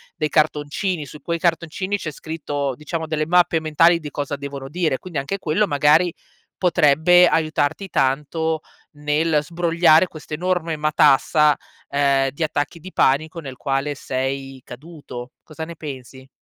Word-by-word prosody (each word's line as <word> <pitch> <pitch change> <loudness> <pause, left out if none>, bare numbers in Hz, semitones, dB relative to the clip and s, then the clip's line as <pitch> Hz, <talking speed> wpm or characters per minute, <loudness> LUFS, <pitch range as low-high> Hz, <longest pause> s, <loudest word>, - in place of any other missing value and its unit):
dei 155 - -1
cartoncini. 155 +3 0
Su 150 +2 -12
quei 170 +3 -2
cartoncini 170 +4 -1
c'è 160 -6 -5
scritto 145 -3 -4
diciamo 160 +3 -5
delle 155 -1 -1
mappe 175 -1 +3
mentali 165 +2 +4
di 150 -1 -7
cosa 145 0 -3
devono 140 -1 -7
dire. 155 -4 -1
Quindi, 170 -6 -5
anche 145 +9 -4
quello 185 +5 +1
magari, 150 +4 +3 0.4
potrebbe 175 +1 +5
aiutarti 160 +2 0
tanto 155 +4 0 0.3
nel 150 +2 +1
sbrogliare 170 +1 +3
questa 155 -2 -11
enorme 175 -1 -1
matassa, 150 0 +4 0.3
ehm, 140 -1 +2
di 140 - -4
attacchi 150 +2 -2
di 185 +4 -10
panico 155 +5 +1
nel 135 -5 -8
quale 140 +2 -2
sei 135 0 -4
caduto. 130 -3 -10
Cosa 160 0 -8
ne 170 +1 -9
pensi? 130 -3 -9
155 Hz, 145 wpm, -21 LUFS, 140-165 Hz, 0.4 s, potrebbe